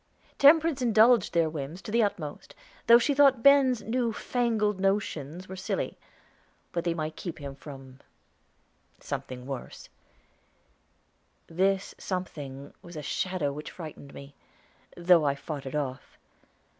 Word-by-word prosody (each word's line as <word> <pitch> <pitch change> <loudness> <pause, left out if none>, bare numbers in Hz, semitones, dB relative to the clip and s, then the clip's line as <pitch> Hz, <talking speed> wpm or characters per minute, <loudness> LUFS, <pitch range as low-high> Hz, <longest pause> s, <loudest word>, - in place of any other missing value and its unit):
Temperance 305 0 +5
indulged 230 -2 +4
their 165 -1 +2
whims 155 +2 -6
to - - -7
the 230 +2 +3
utmost, 175 -8 -3 0.3
though 235 - +9
she 265 +4 +1
thought 275 -4 +4
Ben's 275 -4 +5
new 235 +1 0
fangled 220 -4 0
notions 185 -4 -2
were 190 - -7
silly; 190 - -3 0.8
but 170 - -2
they 170 -1 -1
might 155 -1 -4
keep 175 - -6
him 140 -2 -7
from 135 -2 -12 1.0
something 125 -1 -6
worse. 135 -2 -8 1.6
This 190 +3 0
something 145 -7 -6
was 175 -2 -11
a 150 - -6
shadow 170 -2 -2
which 150 +1 -7
frightened 155 -4 -10
me, 140 +1 -11 0.6
though 175 -2 +5
I 140 -1 +1
fought 140 -1 -6
it 135 - -5
off. 135 -3 -4
175 Hz, 130 wpm, -28 LUFS, 145-225 Hz, 1.6 s, though